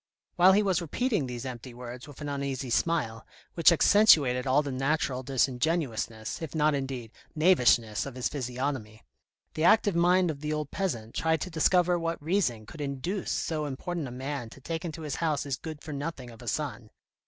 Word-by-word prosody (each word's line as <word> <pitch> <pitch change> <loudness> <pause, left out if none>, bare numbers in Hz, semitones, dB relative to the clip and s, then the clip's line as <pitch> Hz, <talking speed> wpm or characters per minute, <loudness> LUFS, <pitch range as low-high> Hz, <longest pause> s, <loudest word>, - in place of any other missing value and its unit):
While 185 +1 +7
he 210 +2 +4
was 185 -3 +1
repeating 200 - -1
these 125 0 -6
empty 125 -1 -7
words 125 +1 -8
with 145 0 -12
an 145 - -4
uneasy 140 -3 -3
smile, 115 -7 0 0.3
which 165 0 +6
accentuated 150 - +5
all 140 +3 +3
the 140 - -4
natural 135 0 0
disingenuousness, 130 -3 -1
if 160 -1 -6
not, 155 -1 +3
indeed, 135 -5 -4 0.2
knavishness 125 - +3
of 135 - -8
his 125 - -1
physiognomy, 125 -4 -4 0.5
the 155 - -2
active 205 +1 +4
mind 175 0 +4
of 145 - -8
the 150 0 -2
old 150 -2 -3
peasant 120 - -3
tried 160 -1 +1
to 185 - -4
discover 175 +2 +3
what 165 0 -2
reason 145 - 0
could 150 +7 -10
induce 145 +8 -3
so 160 - -1
so - - -2
important 150 +3 -4
a - - -8
man 130 -1 -5
to 135 - -14
take 160 +4 -4
into 160 -2 -6
his 150 -3 -3
house 155 -3 0
his 140 -2 -2
good 155 0 -8
for 155 - -6
nothing 140 -4 -5
of 115 - -14
a 120 - -11
son. 120 -6 -3
145 Hz, 190 wpm, -28 LUFS, 125-165 Hz, 0.5 s, While